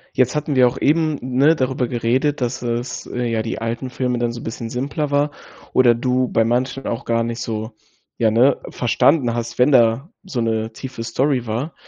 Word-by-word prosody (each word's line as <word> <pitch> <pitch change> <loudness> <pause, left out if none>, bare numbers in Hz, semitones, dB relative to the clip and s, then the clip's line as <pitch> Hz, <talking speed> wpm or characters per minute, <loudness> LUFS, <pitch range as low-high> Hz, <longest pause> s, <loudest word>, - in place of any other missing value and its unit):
Jetzt 130 +3 +2
hatten 150 -1 -1
wir 125 -1 +6
auch 120 - -6
eben, 155 0 +2
ne, 135 +5 +3
darüber 130 -2 -1
geredet, 125 +5 0
dass 120 0 -2
es 120 +1 -3
äh, 125 0 -3
ja 115 -1 0
die 115 0 -4
alten 115 +3 -3
Filme 125 -1 -2
dann 120 0 0
so 120 0 -6
'n - - -10
bisschen 115 0 -5
simpler 140 +5 -3
war 145 +1 +2 0.4
oder 120 -2 +5
du 125 +1 0
bei 115 -1 +2
manchen 125 +3 -1
auch 115 - -3
gar 115 0 +1
nicht 115 0 -4
so 110 0 -4 0.4
ja, 115 -2 +3
ne, 125 +5 +3
verstanden 125 +1 +2
hast, 120 0 -4
wenn 130 +4 +4
da 120 - +3
so 140 - -3
'ne 110 0 -1
tiefe 130 -3 -7
Story 125 +2 0
war. 120 +9 -3
125 Hz, 200 wpm, -20 LUFS, 115-135 Hz, 0.4 s, wir